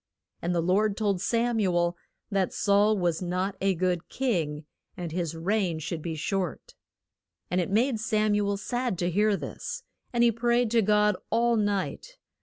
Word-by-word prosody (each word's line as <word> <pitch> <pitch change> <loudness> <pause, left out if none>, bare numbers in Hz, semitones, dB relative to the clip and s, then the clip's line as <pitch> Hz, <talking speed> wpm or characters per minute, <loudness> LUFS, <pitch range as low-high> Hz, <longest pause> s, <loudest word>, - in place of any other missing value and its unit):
And 175 +1 -1
the 170 - +1
Lord 200 +4 +2
told 200 -4 0
Sam 235 +1 +1
u 185 -4 +1
el 175 0 +2 0.4
that 195 -2 +1
Saul 205 +1 +3
was 175 -3 0
not 185 +2 -1
a 195 -1 +2
good 180 0 -1
king, 160 - -1 0.3
and 175 -3 -4
his 170 -1 -2
reign 180 0 0
should 160 +1 -4
be 165 0 -4
short. 180 +2 -3 0.8
And 180 +1 +2
it 175 - -3
made 225 +3 +2
Sam 215 -1 +1
u 205 -1 +1
el 200 - 0
sad 245 -1 -2
to 175 +1 0
hear 210 +2 +2
this, - - -6 0.3
and 240 -1 +2
he 235 - +5
prayed 235 0 +1
to 230 -1 +4
God 210 -1 +3
all 235 +1 +3
night. 205 - -2
200 Hz, 180 wpm, -27 LUFS, 175-215 Hz, 0.8 s, he